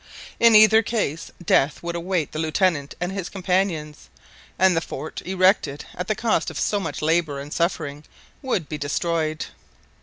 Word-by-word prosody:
In 230 Hz, -1 st, +6 dB
either 215 Hz, +1 st, +7 dB
case 200 Hz, -9 st, -2 dB, 0.2 s
death 140 Hz, +2 st, +2 dB
would 170 Hz, 0 st, -3 dB
await 170 Hz, -3 st, -1 dB
the 155 Hz, -, -5 dB
Lieutenant 160 Hz, -2 st, 0 dB
and 180 Hz, +1 st, -2 dB
his 195 Hz, -3 st, -4 dB
companions, 180 Hz, -5 st, -2 dB, 0.5 s
and 185 Hz, -1 st, +4 dB
the 165 Hz, -, +1 dB
fort, 155 Hz, -1 st, -6 dB
erected 185 Hz, -6 st, +2 dB
at 180 Hz, +1 st, -5 dB
the 215 Hz, -, 0 dB
cost 230 Hz, -1 st, 0 dB
of -, -, -8 dB
so 205 Hz, -, +1 dB
much 165 Hz, -5 st, -5 dB
labour 160 Hz, -3 st, +1 dB
and 145 Hz, +2 st, -7 dB
suffering, 155 Hz, -4 st, -2 dB, 0.4 s
would 225 Hz, -, -1 dB
be 150 Hz, -, -5 dB
destroyed. 155 Hz, +1 st, -1 dB
170 Hz, 160 wpm, -23 LUFS, 155-190 Hz, 0.5 s, either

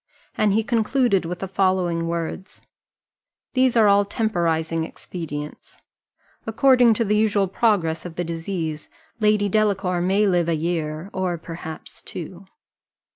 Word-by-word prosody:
And 210 Hz, -2 st, +2 dB
he 220 Hz, +2 st, +2 dB
concluded 230 Hz, -4 st, +1 dB
with 175 Hz, +1 st, -4 dB
the 195 Hz, -, -3 dB
following 185 Hz, -3 st, 0 dB
words: 170 Hz, +3 st, -5 dB, 0.9 s
"These 255 Hz, -1 st, +3 dB
are 220 Hz, -2 st, +6 dB
all 200 Hz, 0 st, +5 dB
temporizing 165 Hz, -6 st, -1 dB
expedients: 150 Hz, -3 st, -8 dB, 0.6 s
according 245 Hz, 0 st, +4 dB
to 230 Hz, -, 0 dB
the 210 Hz, +1 st, +1 dB
usual 210 Hz, -2 st, +2 dB
progress 185 Hz, -5 st, +1 dB
of 175 Hz, -2 st, -8 dB
the 175 Hz, -, -2 dB
disease, 165 Hz, -2 st, -4 dB, 0.3 s
Lady 210 Hz, -1 st, +3 dB
Delacour 195 Hz, -3 st, +1 dB
may 195 Hz, +4 st, +2 dB
live 175 Hz, -4 st, +2 dB
a 165 Hz, -, +2 dB
year, 160 Hz, +2 st, -3 dB
or 185 Hz, -2 st, -1 dB
perhaps 165 Hz, -1 st, -9 dB
two. 180 Hz, +3 st, -8 dB
185 Hz, 130 wpm, -23 LUFS, 165-210 Hz, 0.9 s, are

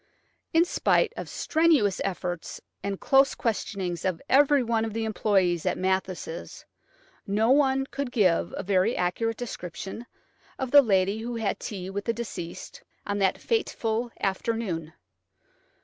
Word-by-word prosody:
In 330 Hz, +1 st, +4 dB
spite 445 Hz, +5 st, +2 dB
of -, -, -6 dB
strenuous 305 Hz, -, +2 dB
efforts 175 Hz, -3 st, -4 dB, 0.2 s
and 200 Hz, -1 st, -3 dB
close 270 Hz, 0 st, +4 dB
questionings 195 Hz, -5 st, -2 dB
of 185 Hz, -3 st, -1 dB
every 285 Hz, 0 st, +5 dB
one 230 Hz, -1 st, 0 dB
of 225 Hz, -2 st, -3 dB
the 225 Hz, 0 st, -2 dB
employees 195 Hz, -6 st, +1 dB
at 185 Hz, -, 0 dB
Mathis', 185 Hz, -3 st, -3 dB, 0.6 s
no 215 Hz, +4 st, +2 dB
one 270 Hz, -1 st, +3 dB
could 275 Hz, -1 st, -4 dB
give 180 Hz, -7 st, +2 dB
a -, -, -3 dB
very 195 Hz, +3 st, +2 dB
accurate 225 Hz, +6 st, -1 dB
description 195 Hz, 0 st, -6 dB, 0.5 s
of 265 Hz, -2 st, -3 dB
the 285 Hz, -, +9 dB
lady 200 Hz, -3 st, +2 dB
who 235 Hz, +2 st, -4 dB
had 220 Hz, -4 st, -1 dB
tea 190 Hz, -3 st, -6 dB
with 200 Hz, +1 st, -4 dB
the 230 Hz, -, +1 dB
deceased 215 Hz, -7 st, -7 dB, 0.2 s
on 205 Hz, 0 st, -2 dB
that 190 Hz, -1 st, +2 dB
fateful 240 Hz, -, -1 dB
afternoon. 190 Hz, -5 st, -2 dB
215 Hz, 140 wpm, -27 LUFS, 185-245 Hz, 0.6 s, the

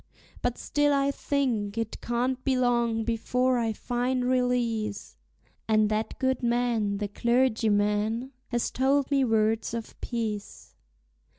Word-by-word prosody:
But 245 Hz, -1 st, -1 dB
still 290 Hz, 0 st, +1 dB
I 280 Hz, 0 st, +2 dB
think 240 Hz, -8 st, -1 dB
it 225 Hz, -1 st, -3 dB
can't 250 Hz, +2 st, -1 dB
be 265 Hz, -2 st, +1 dB
long 235 Hz, -2 st, +1 dB
before 250 Hz, +2 st, +1 dB
I 225 Hz, -1 st, 0 dB
find 245 Hz, +3 st, -1 dB
release; 245 Hz, -4 st, 0 dB, 0.5 s
And 215 Hz, -1 st, +3 dB
that 215 Hz, +1 st, -2 dB
good 260 Hz, 0 st, 0 dB
man, 235 Hz, -4 st, +1 dB
the 205 Hz, 0 st, -2 dB
clergyman, 220 Hz, 0 st, +1 dB, 0.2 s
has 240 Hz, -1 st, -1 dB
told 275 Hz, +2 st, +1 dB
me 275 Hz, -1 st, +3 dB
words 225 Hz, -1 st, +1 dB
of 230 Hz, -1 st, -7 dB
peace. 220 Hz, -4 st, -4 dB
235 Hz, 125 wpm, -27 LUFS, 220-255 Hz, 0.5 s, And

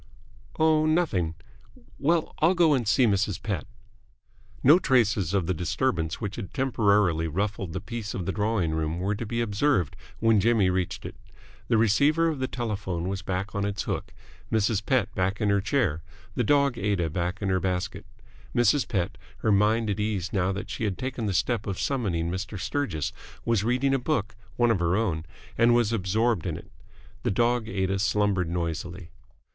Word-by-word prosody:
"Oh, 155 Hz, -1 st, +3 dB
nothing. 120 Hz, -, +1 dB, 0.6 s
Well, 165 Hz, +2 st, +1 dB
I'll 170 Hz, +4 st, +4 dB
go 170 Hz, -3 st, +5 dB
and 125 Hz, -6 st, 0 dB
see 130 Hz, +4 st, +4 dB
Mrs. 100 Hz, -2 st, +1 dB
Pett." 100 Hz, -7 st, -3 dB, 1.0 s
No 150 Hz, +7 st, +7 dB
traces 110 Hz, -, +2 dB
of 95 Hz, -4 st, +1 dB
the 95 Hz, -, 0 dB
disturbance 85 Hz, -1 st, -1 dB
which 105 Hz, -3 st, -4 dB
had 100 Hz, -6 st, -7 dB
temporarily 105 Hz, -, +2 dB
ruffled 95 Hz, +2 st, -2 dB
the -, -, -4 dB
peace 115 Hz, -3 st, -5 dB
of 90 Hz, -, -3 dB
the 95 Hz, -, -1 dB
drawing 105 Hz, -5 st, 0 dB
room 80 Hz, +1 st, -1 dB
were 95 Hz, +3 st, -1 dB
to 105 Hz, +2 st, -5 dB
be 115 Hz, +2 st, -1 dB
observed 105 Hz, -, +1 dB, 0.2 s
when 115 Hz, -2 st, +4 dB
Jimmy 105 Hz, -3 st, +3 dB
reached 90 Hz, -1 st, -2 dB
it. -, -, -6 dB, 0.5 s
The 115 Hz, -, +3 dB
receiver 145 Hz, +10 st, +3 dB
of 155 Hz, -4 st, -3 dB
the 130 Hz, -, -1 dB
telephone 100 Hz, -8 st, -3 dB
was 95 Hz, -1 st, -3 dB
back 95 Hz, +1 st, -3 dB
on 100 Hz, -, -1 dB
its 100 Hz, 0 st, -2 dB
hook, -, -, -4 dB, 0.4 s
Mrs. 110 Hz, -2 st, +1 dB
Pett 125 Hz, -5 st, +1 dB
back 95 Hz, +2 st, -1 dB
in 105 Hz, -, +1 dB
her 100 Hz, 0 st, +2 dB
chair, 95 Hz, -, 0 dB, 0.3 s
the -, -, 0 dB
dog 140 Hz, -4 st, +2 dB
Aida 100 Hz, -4 st, 0 dB
back 90 Hz, +3 st, -2 dB
in 100 Hz, -, -2 dB
her 95 Hz, 0 st, +2 dB
basket. 90 Hz, 0 st, -3 dB, 0.5 s
Mrs. 120 Hz, +4 st, +3 dB
Pett, 100 Hz, -1 st, -2 dB, 0.2 s
her 110 Hz, -, +2 dB
mind 105 Hz, +3 st, +3 dB
at 100 Hz, -, -3 dB
ease 105 Hz, -4 st, -2 dB
now 95 Hz, -1 st, +1 dB
that 100 Hz, +1 st, -5 dB
she -, -, -4 dB
had 100 Hz, -3 st, -2 dB
taken 130 Hz, -4 st, -3 dB
the -, -, 0 dB
step 105 Hz, +6 st, 0 dB
of 95 Hz, -2 st, -3 dB
summoning 90 Hz, -11 st, -1 dB
Mr. 95 Hz, +2 st, -4 dB
Sturgis, 95 Hz, -, -2 dB, 0.3 s
was 115 Hz, -4 st, +2 dB
reading 125 Hz, +4 st, +1 dB
a 135 Hz, -, +2 dB
book, 115 Hz, -5 st, -1 dB, 0.2 s
one 120 Hz, -1 st, +3 dB
of 105 Hz, -, +1 dB
her 85 Hz, +1 st, +1 dB
own, 85 Hz, -8 st, -1 dB, 0.3 s
and 120 Hz, 0 st, +5 dB
was 115 Hz, -2 st, +2 dB
absorbed 110 Hz, 0 st, +1 dB
in -, -, -3 dB
it. -, -, -13 dB, 0.5 s
The -, -, 0 dB
dog 120 Hz, +2 st, +1 dB
Aida 95 Hz, 0 st, -1 dB
slumbered 100 Hz, -2 st, +1 dB
noisily. 85 Hz, +1 st, -4 dB
105 Hz, 185 wpm, -26 LUFS, 95-120 Hz, 1.0 s, No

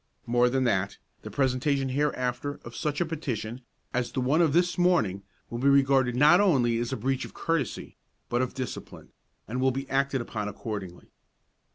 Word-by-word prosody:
More 120 Hz, +1 st, +3 dB
than 130 Hz, +1 st, +1 dB
that, 100 Hz, -5 st, 0 dB, 0.2 s
the -, -, -8 dB
presentation 135 Hz, +1 st, +1 dB
hereafter 135 Hz, 0 st, -1 dB
of 120 Hz, 0 st, -9 dB
such 150 Hz, -1 st, -2 dB
a -, -, +2 dB
petition 130 Hz, -7 st, -4 dB, 0.3 s
as 125 Hz, -1 st, -1 dB
the -, -, -2 dB
one 135 Hz, +6 st, +2 dB
of 165 Hz, -4 st, +4 dB
this 175 Hz, +3 st, +2 dB
morning 145 Hz, -, +2 dB, 0.3 s
will 120 Hz, -, -3 dB
be 140 Hz, +3 st, +3 dB
regarded 135 Hz, -3 st, +4 dB
not 150 Hz, +8 st, +6 dB
only 125 Hz, -, +3 dB
as 120 Hz, 0 st, -2 dB
a -, -, -2 dB
breach 130 Hz, +4 st, -1 dB
of -, -, -10 dB
courtesy, 165 Hz, -8 st, -2 dB, 0.3 s
but 120 Hz, +1 st, 0 dB
of 130 Hz, -, -2 dB
discipline, 130 Hz, -3 st, -6 dB, 0.4 s
and 125 Hz, +5 st, -3 dB
will 130 Hz, -, +4 dB
be 135 Hz, +1 st, -3 dB
acted 135 Hz, 0 st, +1 dB
upon 110 Hz, -3 st, -4 dB
accordingly. 100 Hz, -3 st, -6 dB
130 Hz, 180 wpm, -27 LUFS, 120-145 Hz, 0.4 s, not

